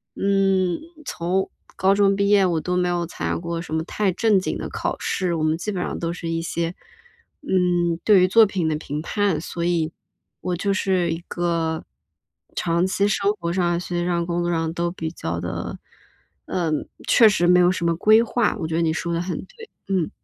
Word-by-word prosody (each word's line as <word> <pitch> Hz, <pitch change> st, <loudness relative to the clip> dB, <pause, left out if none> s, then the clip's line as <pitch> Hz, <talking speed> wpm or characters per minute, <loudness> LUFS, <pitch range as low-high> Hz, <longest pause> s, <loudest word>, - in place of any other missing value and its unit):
嗯， 195 Hz, -2 st, +2 dB, 0.3 s
从 185 Hz, -3 st, -1 dB, 0.3 s
高 190 Hz, +1 st, +3 dB
中 200 Hz, -1 st, +4 dB
毕 200 Hz, 0 st, +1 dB
业 205 Hz, -2 st, +5 dB
我 170 Hz, -3 st, +1 dB
都 180 Hz, +2 st, -2 dB
没 180 Hz, 0 st, +1 dB
有 175 Hz, -1 st, 0 dB
参 -, -, -4 dB
加 -, -, 0 dB
过 170 Hz, 0 st, -4 dB
什 165 Hz, -, -8 dB
么 160 Hz, -, 0 dB
太 200 Hz, +1 st, 0 dB
正 210 Hz, +2 st, +3 dB
经 185 Hz, -, -3 dB
的 -, -, -5 dB
考 -, -, -3 dB
试， 180 Hz, -2 st, -1 dB
我 160 Hz, -, -1 dB
们 155 Hz, +1 st, +1 dB
基 210 Hz, +5 st, -3 dB
本 185 Hz, -3 st, -3 dB
上 -, -, -3 dB
都 165 Hz, 0 st, -2 dB
是 170 Hz, -1 st, -6 dB
一 165 Hz, 0 st, -1 dB
些， 170 Hz, +1 st, -2 dB, 0.7 s
嗯， 175 Hz, -, +1 dB
对 210 Hz, -3 st, +6 dB
于 185 Hz, -, +5 dB
作 225 Hz, +4 st, +6 dB
品 190 Hz, -5 st, -1 dB
的 155 Hz, -, +1 dB
评 150 Hz, -1 st, -5 dB
判。 195 Hz, -1 st, 0 dB
所 170 Hz, 0 st, -5 dB
以 165 Hz, -2 st, 0 dB, 0.5 s
我 180 Hz, -, -1 dB
就 195 Hz, +3 st, 0 dB
是 185 Hz, -4 st, +1 dB
一 165 Hz, -, -2 dB
个 165 Hz, -2 st, -1 dB, 0.7 s
长 170 Hz, +1 st, +1 dB
期 200 Hz, +1 st, +1 dB
生 200 Hz, 0 st, +1 dB
活 170 Hz, 0 st, -2 dB
上、 175 Hz, -2 st, +1 dB
学 175 Hz, 0 st, -3 dB
习 175 Hz, -, -1 dB
上、 170 Hz, -1 st, 0 dB
工 175 Hz, 0 st, -1 dB
作 175 Hz, -, 0 dB
上 165 Hz, -1 st, -1 dB
都 170 Hz, 0 st, -1 dB
比 165 Hz, -3 st, -5 dB
较 85 Hz, -, -4 dB
地， 85 Hz, 0 st, -4 dB, 0.7 s
嗯， 160 Hz, -4 st, -1 dB, 0.2 s
确 225 Hz, -2 st, +7 dB
实 190 Hz, -4 st, +1 dB
没 180 Hz, 0 st, +6 dB
有 180 Hz, 0 st, +5 dB
什 185 Hz, -2 st, -2 dB
么 170 Hz, 0 st, +2 dB
规 215 Hz, +6 st, +5 dB
划， 240 Hz, +1 st, +1 dB
我 160 Hz, -, -2 dB
觉 160 Hz, -, -4 dB
得 170 Hz, -, +1 dB
你 165 Hz, -1 st, +2 dB
说 170 Hz, +1 st, -2 dB
得 170 Hz, -, 0 dB
很 175 Hz, -3 st, -3 dB
对， 450 Hz, -, -14 dB, 0.2 s
嗯。 185 Hz, -5 st, 0 dB
175 Hz, 230 characters per minute, -23 LUFS, 165-190 Hz, 0.7 s, 确